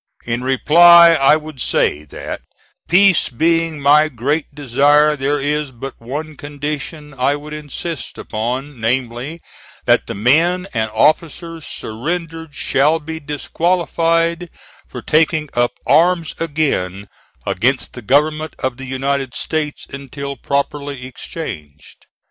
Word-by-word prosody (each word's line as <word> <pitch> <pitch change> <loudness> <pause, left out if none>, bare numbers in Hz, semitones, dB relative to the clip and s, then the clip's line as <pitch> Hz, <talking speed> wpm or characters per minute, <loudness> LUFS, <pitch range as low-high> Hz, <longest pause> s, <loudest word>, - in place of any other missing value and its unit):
In 120 +1 -2
reply 170 +6 +7
I 145 -1 +5
would 155 -4 -7
say 75 -6 +1
that, 70 - -7 0.5
peace 190 +2 +5
being 165 +4 +1
my 150 +2 +5
great 140 +5 -1
desire, 145 +2 +3
there 145 +1 -1
is 145 +1 -1
but 130 +2 -8
one 150 +6 -5
condition 150 +1 -6
I 135 +2 +1
would 150 +1 -9
insist 150 0 -6
upon, 125 +5 -4
namely: 125 +6 -2 0.4
that - - +3
the - - -5
men 165 - +3
and 110 -2 -1
officers 165 +4 0
surrendered 160 +6 -5
shall 150 +5 +2
be 160 +1 -7
disqualified 165 +2 0 0.4
for - - -8
taking 155 -1 +2
up 120 0 +1
arms 170 +2 +3
again 135 - -1 0.4
against 125 +8 0
the 125 - -8
Government 150 +6 +1
of 130 -1 -3
the 135 - -8
United 135 0 -2
States 155 -2 -3
until 140 0 -6
properly 140 -1 -3
exchanged. 75 - -9
145 Hz, 120 wpm, -18 LUFS, 130-160 Hz, 0.5 s, reply